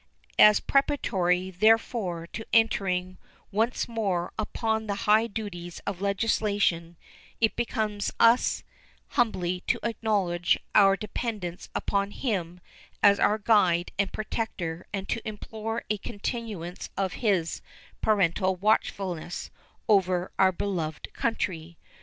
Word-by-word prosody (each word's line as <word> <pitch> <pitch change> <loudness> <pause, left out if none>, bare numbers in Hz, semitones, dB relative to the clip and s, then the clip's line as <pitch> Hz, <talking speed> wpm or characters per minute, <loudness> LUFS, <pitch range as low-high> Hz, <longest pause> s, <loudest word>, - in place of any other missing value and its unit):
As 210 0 +8
preparatory, 190 -10 +1
therefore, 205 -3 +2
to 220 - -5
entering 185 -5 +1 0.3
once 225 +5 0
more 195 -7 -1
upon 220 0 -1
the 200 - -1
high 215 +2 +5
duties 180 -6 -6
of 195 -2 -4
legislation, 200 -4 0 0.4
it 220 -1 +2
becomes 215 -3 -1
us 230 +2 +4 0.5
humbly 185 -8 0
to - - +2
acknowledge 205 -7 +1 0.2
our 195 -2 +6
dependence 210 -5 -5
upon 200 0 0
Him 180 -7 -3 0.4
as 200 0 +6
our 210 - +3
guide 190 -6 +3
and 200 -1 +1
protector 185 -6 -4
and 195 -1 -4
to 230 - -2
implore 220 +1 -5
a 210 - 0
continuance 200 -5 -5
of 190 -2 -1
His 190 -8 +1 0.4
parental 190 -2 +2
watchfulness 185 -3 -1 0.4
over 185 -4 +2
our 190 -1 +6
beloved 170 -5 -4
country. 170 -7 -2
200 Hz, 110 wpm, -27 LUFS, 180-220 Hz, 0.5 s, As